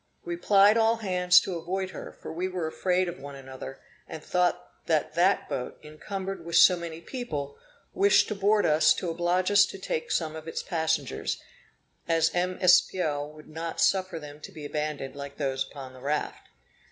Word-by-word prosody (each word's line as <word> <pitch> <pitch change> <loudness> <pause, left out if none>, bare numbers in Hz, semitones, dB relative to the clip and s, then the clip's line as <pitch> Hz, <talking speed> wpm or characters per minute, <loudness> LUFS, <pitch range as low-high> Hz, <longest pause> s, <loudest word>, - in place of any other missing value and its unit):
We 170 0 -3
plied 200 +4 +5
all 225 0 +4
hands 180 -4 +4
to 180 -3 -4
avoid 190 +3 -3
her, - - -8
for - - -9
we 180 +3 -2
were 180 -3 -3
afraid 180 +3 0
of 175 0 -6
one 140 0 -9
another, 135 0 -9 0.3
and 160 - -8
thought 180 -1 0 0.2
that 155 -2 +1
that 180 +4 +2
boat, 125 - -4
encumbered 190 +4 -6
with 170 0 -4
so 185 - +8
many 170 -1 -7
people, 150 - -5 0.4
wished 400 +1 +4
to - - -1
board 205 +1 +2
us 155 0 +4
to 175 - -3
oblige 175 +3 0
us 205 0 +7
to - - -8
take 175 -4 -3
some 160 -2 -1
of 160 0 -9
its 165 - -4
passengers, 160 - -1 0.7
as 165 0 +2
M. 180 +1 -1
Espiau 165 -5 +3
would 155 0 -14
not 160 +1 -6
suffer 185 -3 +2
them 150 -1 -10
to - - -10
be 155 -2 -9
abandoned 150 -2 -4
like 140 0 -8
those 135 -2 -1
upon 135 -2 -9
the 130 - -14
raft. 150 +2 -3
170 Hz, 185 wpm, -27 LUFS, 150-185 Hz, 0.7 s, so